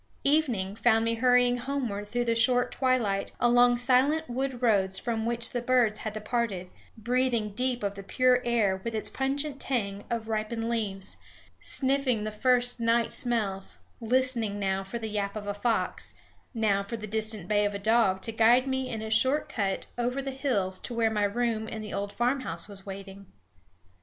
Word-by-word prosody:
Evening 245 Hz, -10 st, +1 dB
found 225 Hz, 0 st, +3 dB
me 230 Hz, -, +1 dB
hurrying 245 Hz, +1 st, +3 dB
homeward 240 Hz, -6 st, -3 dB
through 240 Hz, +3 st, -1 dB
the 230 Hz, -, +2 dB
short 245 Hz, +2 st, +3 dB
twilight, 240 Hz, -7 st, 0 dB
along 245 Hz, 0 st, +4 dB
silent 265 Hz, +6 st, +2 dB
wood 255 Hz, 0 st, -3 dB
roads 195 Hz, -5 st, +2 dB
from 225 Hz, -1 st, -2 dB
which 235 Hz, 0 st, +1 dB
the 245 Hz, -, -2 dB
birds 240 Hz, -3 st, +2 dB
had 215 Hz, -, -4 dB
departed, 215 Hz, -4 st, -3 dB, 0.3 s
breathing 240 Hz, -1 st, 0 dB
deep 250 Hz, +1 st, -1 dB
of 200 Hz, -1 st, -1 dB
the 200 Hz, -, -8 dB
pure 250 Hz, +5 st, +2 dB
air 210 Hz, -6 st, +1 dB
with 230 Hz, -1 st, -3 dB
its 215 Hz, -, -2 dB
pungent 275 Hz, +1 st, -2 dB
tang 205 Hz, -7 st, -2 dB
of 230 Hz, -2 st, -3 dB
ripened 225 Hz, +1 st, -2 dB
leaves, 205 Hz, -5 st, -3 dB, 0.4 s
sniffing 265 Hz, -4 st, 0 dB
the 215 Hz, -, -3 dB
first 245 Hz, +2 st, +2 dB
night 230 Hz, 0 st, +1 dB
smells, 210 Hz, -6 st, -1 dB, 0.2 s
listening 235 Hz, -3 st, 0 dB
now 195 Hz, -1 st, -1 dB
for 195 Hz, +5 st, -5 dB
the 225 Hz, -1 st, -5 dB
yap 205 Hz, -1 st, -2 dB
of 210 Hz, -1 st, -5 dB
a 205 Hz, -, -2 dB
fox, 225 Hz, +3 st, -2 dB, 0.4 s
now 215 Hz, -5 st, +1 dB
for 200 Hz, +4 st, -5 dB
the 215 Hz, -, -7 dB
distant 215 Hz, -3 st, -1 dB
bay 210 Hz, 0 st, +2 dB
of 205 Hz, 0 st, -1 dB
a -, -, -1 dB
dog 200 Hz, -2 st, +2 dB
to 225 Hz, -, -3 dB
guide 230 Hz, +3 st, +4 dB
me 265 Hz, -1 st, -2 dB
in 220 Hz, -2 st, -4 dB
a 220 Hz, -, -5 dB
short 260 Hz, +7 st, +5 dB
cut 200 Hz, -3 st, -2 dB
over 250 Hz, +3 st, -1 dB
the 270 Hz, 0 st, -3 dB
hills 205 Hz, -9 st, -1 dB
to 240 Hz, -, -5 dB
where 225 Hz, -1 st, +2 dB
my 210 Hz, -1 st, 0 dB
room 220 Hz, +1 st, -1 dB
in 220 Hz, -, -6 dB
the 215 Hz, -1 st, -7 dB
old 200 Hz, 0 st, -3 dB
farmhouse 240 Hz, -10 st, -1 dB
was 200 Hz, -1 st, -11 dB
waiting. 195 Hz, 0 st, -9 dB
230 Hz, 180 wpm, -28 LUFS, 205-250 Hz, 0.4 s, short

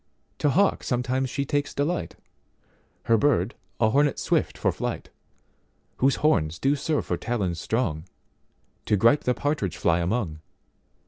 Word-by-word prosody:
To 150 Hz, -, +2 dB
hawk 195 Hz, +8 st, +2 dB
sometimes 130 Hz, +1 st, -1 dB
she 140 Hz, +3 st, -2 dB
takes 145 Hz, +1 st, -1 dB
delight, 155 Hz, +5 st, -1 dB, 0.9 s
Her 115 Hz, -1 st, +3 dB
bird 115 Hz, -6 st, +2 dB, 0.3 s
a 110 Hz, -1 st, +3 dB
hornet 145 Hz, +2 st, +2 dB
swift -, -, 0 dB
for -, -, +1 dB
flight, -, -, -5 dB, 0.9 s
Whose 135 Hz, 0 st, +3 dB
horns 85 Hz, -, +2 dB
do 140 Hz, +2 st, +2 dB
serve 150 Hz, +1 st, -1 dB
for 90 Hz, -, -1 dB
talons 95 Hz, -8 st, -2 dB
strong, 90 Hz, -10 st, -1 dB, 0.8 s
To 105 Hz, -, +3 dB
gripe 115 Hz, +8 st, +4 dB
the 125 Hz, -, +2 dB
partridge 145 Hz, -, -2 dB
fly 85 Hz, 0 st, +2 dB
among. 85 Hz, -3 st, -1 dB
125 Hz, 140 wpm, -25 LUFS, 95-145 Hz, 0.9 s, gripe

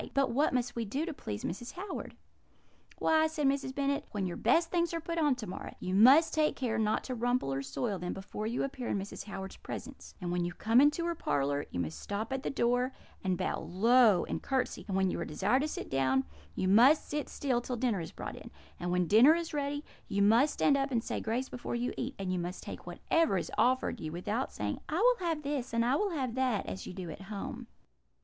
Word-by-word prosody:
But 275 Hz, -3 st, +3 dB
what 285 Hz, +6 st, +2 dB
must 245 Hz, -1 st, -1 dB
we 235 Hz, -, -1 dB
do 265 Hz, +9 st, -2 dB
to 335 Hz, -, -4 dB
please 105 Hz, -, -6 dB
Mrs. 235 Hz, +7 st, -5 dB
Howard?' 380 Hz, +2 st, -6 dB, 0.8 s
"'Why,' 315 Hz, 0 st, +3 dB
said 310 Hz, -2 st, -2 dB
Mrs. 270 Hz, -1 st, 0 dB
Bennet, 280 Hz, 0 st, 0 dB
'when 200 Hz, -2 st, -2 dB
your 175 Hz, -, -3 dB
best 330 Hz, +9 st, +2 dB
things 340 Hz, -1 st, +1 dB
are -, -, -1 dB
put 335 Hz, +1 st, -3 dB
on 295 Hz, -4 st, +3 dB
to 240 Hz, -4 st, -6 dB
morrow, 185 Hz, -, -7 dB
you 185 Hz, -, -3 dB
must 260 Hz, -, +7 dB
take 305 Hz, -1 st, +2 dB
care 230 Hz, -4 st, -1 dB
not 215 Hz, 0 st, +1 dB
to 255 Hz, -, -4 dB
rumple 245 Hz, -, 0 dB
or 135 Hz, -, -1 dB
soil 195 Hz, -, -3 dB
them 180 Hz, 0 st, -3 dB
before 200 Hz, +2 st, -5 dB
you 235 Hz, +2 st, -1 dB
appear 260 Hz, -3 st, -4 dB
in -, -, 0 dB
Mrs. 195 Hz, +1 st, -6 dB
Howard's 195 Hz, -2 st, -7 dB
presence; -, -, -8 dB
and 175 Hz, -2 st, -3 dB
when 175 Hz, 0 st, 0 dB
you 175 Hz, 0 st, -3 dB
come 225 Hz, +7 st, +4 dB
into 295 Hz, +4 st, +3 dB
her 340 Hz, -, 0 dB
parlour 145 Hz, -, -1 dB
you 90 Hz, -, -4 dB
must 80 Hz, -2 st, -3 dB
stop 215 Hz, +5 st, -3 dB
at 265 Hz, -, -2 dB
the -, -, -2 dB
door, 245 Hz, +1 st, +1 dB, 0.3 s
and 185 Hz, -2 st, 0 dB
bow -, -, -1 dB
low 220 Hz, 0 st, +4 dB
and -, -, -3 dB
curtsey; 265 Hz, -2 st, -1 dB
and 190 Hz, -2 st, -1 dB
when 190 Hz, -1 st, +2 dB
you -, -, -3 dB
are -, -, -1 dB
desired 200 Hz, -, +1 dB
to 300 Hz, -, 0 dB
sit -, -, -5 dB
down, 135 Hz, 0 st, +2 dB, 0.3 s
you 185 Hz, -, 0 dB
must 245 Hz, +10 st, +6 dB
sit 295 Hz, -1 st, -3 dB
still 255 Hz, -4 st, 0 dB
till 250 Hz, +1 st, -3 dB
dinner 225 Hz, -6 st, 0 dB
is 165 Hz, -, -6 dB
brought -, -, -6 dB
in; -, -, -10 dB, 0.3 s
and 175 Hz, -, -3 dB
when 180 Hz, 0 st, +2 dB
dinner 235 Hz, -, +7 dB
is 335 Hz, -1 st, -4 dB
ready, 290 Hz, 0 st, -2 dB, 0.2 s
you 200 Hz, 0 st, +1 dB
must 235 Hz, +8 st, +5 dB
stand 285 Hz, -, +4 dB
up 275 Hz, 0 st, 0 dB
and 235 Hz, -4 st, 0 dB
say -, -, -3 dB
grace 240 Hz, +4 st, -1 dB
before 245 Hz, -, -5 dB
you 240 Hz, +1 st, -1 dB
eat; 265 Hz, +3 st, -4 dB
and 190 Hz, -2 st, -2 dB
you 180 Hz, -, 0 dB
must 175 Hz, +1 st, -5 dB
take -, -, -8 dB
whatever 330 Hz, -12 st, +1 dB
is -, -, -3 dB
offered 255 Hz, -1 st, +2 dB
you, 155 Hz, -, -5 dB
without 205 Hz, +9 st, -2 dB
saying, 105 Hz, 0 st, -3 dB
"I 310 Hz, -, -1 dB
will 470 Hz, -5 st, +3 dB
have 315 Hz, -2 st, -1 dB
this," 275 Hz, -4 st, -3 dB
and 230 Hz, 0 st, +3 dB
"I 250 Hz, +3 st, +3 dB
will 410 Hz, +6 st, +1 dB
have 265 Hz, -9 st, -2 dB
that," 255 Hz, -5 st, 0 dB
as 190 Hz, -, -6 dB
you -, -, -6 dB
do 180 Hz, -3 st, -6 dB
at 155 Hz, -, -9 dB
home.' 215 Hz, +5 st, -6 dB
240 Hz, 240 wpm, -31 LUFS, 190-280 Hz, 0.8 s, must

